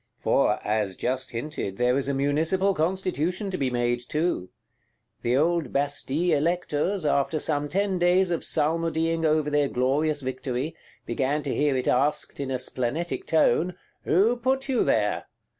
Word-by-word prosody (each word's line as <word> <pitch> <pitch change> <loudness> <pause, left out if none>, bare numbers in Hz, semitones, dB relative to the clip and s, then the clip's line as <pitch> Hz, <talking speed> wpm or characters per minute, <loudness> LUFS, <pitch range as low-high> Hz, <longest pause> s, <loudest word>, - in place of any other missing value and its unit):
For, - - +2
as 105 -3 0
just 130 +4 -2
hinted, 115 -5 -4
there 125 +1 +2
is 135 0 -1
a 140 - 0
Municipal 160 +8 +1
Constitution 185 +2 -1
to 185 - -2
be 135 -2 +1
made 120 0 0
too. 150 - -2 0.7
The 120 +2 +1
old 170 +2 +1
Bastille 145 +4 0
Electors, 170 +3 0
after 140 +2 +1
some 145 -1 -1
ten 195 +1 0
days 180 +1 +3
of 170 - -1
psalmodying 165 +1 0
over 155 -1 +2
their 145 -1 +2
glorious 145 +4 +1
victory, 130 +3 -3 0.3
began 145 +2 -1
to - - -2
hear 145 -3 +1
it 130 - -2
asked, 140 +4 +1
in 140 -1 -3
a 130 - 0
splenetic 130 +6 -3
tone, 170 +2 +2 0.3
Who 210 +9 +3
put 265 +2 0
you 265 -3 +2
there? - - +1
150 Hz, 155 wpm, -26 LUFS, 130-175 Hz, 0.7 s, days